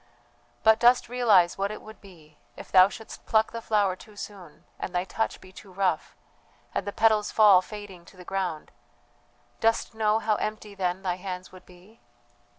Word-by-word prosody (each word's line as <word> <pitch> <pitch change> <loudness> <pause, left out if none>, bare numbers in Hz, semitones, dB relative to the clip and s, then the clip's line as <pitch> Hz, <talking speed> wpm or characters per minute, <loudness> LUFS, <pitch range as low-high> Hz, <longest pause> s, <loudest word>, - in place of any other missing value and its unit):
"But 220 0 +5
dost 245 0 +4
realize 210 -8 +3
what 200 +1 0
it 215 - -6
would 215 -2 -14
be 160 -6 -17 0.2
if - - -11
thou 185 0 +7
shouldst 220 +3 -11
pluck 220 0 +2
the 230 - -6
flower 205 -4 +1
too 210 +2 -16
soon 195 -6 -10 0.2
and 180 - -5
thy 180 - +1
touch 225 +4 -3
be 185 - -15
too 190 +1 -14
rough, 190 0 -1 0.6
and 200 - -3
the - - -2
petals 215 0 +2
fall 205 -4 +6
fading 200 -4 -10
to 185 - -18
the 180 - -12
ground; 180 -5 -3 0.9
dost 225 0 +1
know 215 -1 +2
how 220 -1 0
empty 215 -1 -5
then 190 -1 -2
thy 180 -2 -1
hands 185 -1 -7
would 185 - -15
be? 185 +5 -19
200 Hz, 180 wpm, -26 LUFS, 185-220 Hz, 0.9 s, thou